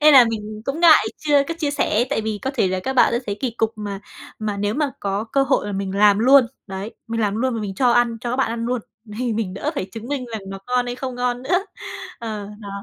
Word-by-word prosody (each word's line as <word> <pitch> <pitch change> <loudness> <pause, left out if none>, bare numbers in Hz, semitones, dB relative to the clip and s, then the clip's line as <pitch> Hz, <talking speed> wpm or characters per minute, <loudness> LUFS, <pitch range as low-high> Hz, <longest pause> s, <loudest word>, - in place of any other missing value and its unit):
Nên 300 0 +7
là 250 -2 +10
mình 215 -1 -5
cũng 290 +5 -2
ngại 330 -3 +7
chưa 290 -2 +3
có 330 - -2
chia 290 -3 0
sẻ, 240 -5 +1
tại 225 - +1
vì 215 -1 -3
có 265 - -1
thể 200 -8 +2
là 185 0 -1
các 265 - -2
bạn 250 - +5
sấy 205 - -1
kỳ 260 - 0
cục, 225 -1 -1
mà 205 -2 -5 0.4
mà 210 -2 -2
nếu 205 +1 -1
mà 295 -1 0
có 200 +2 -1
cơ 270 +4 +1
hội 265 -5 +1
là 205 - -3
mình 195 0 -3
làm 205 0 +5
luôn, 260 +2 +6 0.2
đấy, 195 +3 -6
mình 230 0 -2
làm 205 -1 +1
luôn 255 +1 0
mà 225 - -2
mình 195 -2 -4
cho 245 +3 +3
ăn 240 -1 +3
cho 240 - -3
các 250 - -1
bạn 265 - +1
ăn 230 0 -3
luôn, 250 -1 0 0.4
thì 245 -2 0
mình 210 -4 -2
đỡ 290 +9 -2
phải 230 - -2
chứng 230 +2 -7
minh 280 -3 -2
rằng 220 - -3
nó 195 0 -6
ngon 250 0 +1
hay 245 - -3
không 255 0 -5
ngon 245 0 -1
nữa. 360 +8 +1 0.5
Ờ, 215 -3 -5
đó. 200 - -8
230 Hz, 270 wpm, -22 LUFS, 210-260 Hz, 0.5 s, là